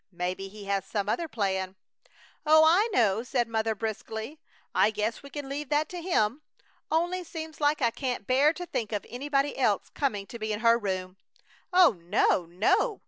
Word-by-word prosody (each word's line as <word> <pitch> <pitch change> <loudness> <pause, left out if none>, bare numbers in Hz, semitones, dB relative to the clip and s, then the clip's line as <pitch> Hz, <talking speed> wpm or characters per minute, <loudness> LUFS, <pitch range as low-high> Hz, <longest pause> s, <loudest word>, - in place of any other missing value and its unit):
Maybe 180 +2 -3
He 205 +1 -11
has 195 -1 0
some 200 0 -3
other 330 +10 -1
plan." 190 -6 -2 0.7
"Oh, 315 +1 +6
I 375 +8 +4
know!" 220 - +3
said 245 -1 -1
Mother, 220 -1 -1
briskly. 220 +5 -5 0.3
"I - - +4
guess 215 +1 -2
we 280 - -11
can 290 -1 -6
leave 280 0 -5
that 300 +1 +1
to 355 -1 -6
Him; 285 - +1 0.5
only 350 +3 0
seems 320 -2 -8
like 290 -1 +2
I 235 - +3
can't 250 -4 -3
bear 270 +6 +4
to 355 +2 -6
think 230 -10 -3
of 205 - -2
anybody 275 +3 -1
else 215 -7 +1
coming 210 -9 -1
to 235 - -9
be 215 0 -3
in 210 0 -3
her 230 0 +5
room." 185 -3 -3 0.5
"Oh 355 - +5
no! 175 -1 +2
no! 215 - +1
235 Hz, 185 wpm, -28 LUFS, 205-300 Hz, 0.7 s, Oh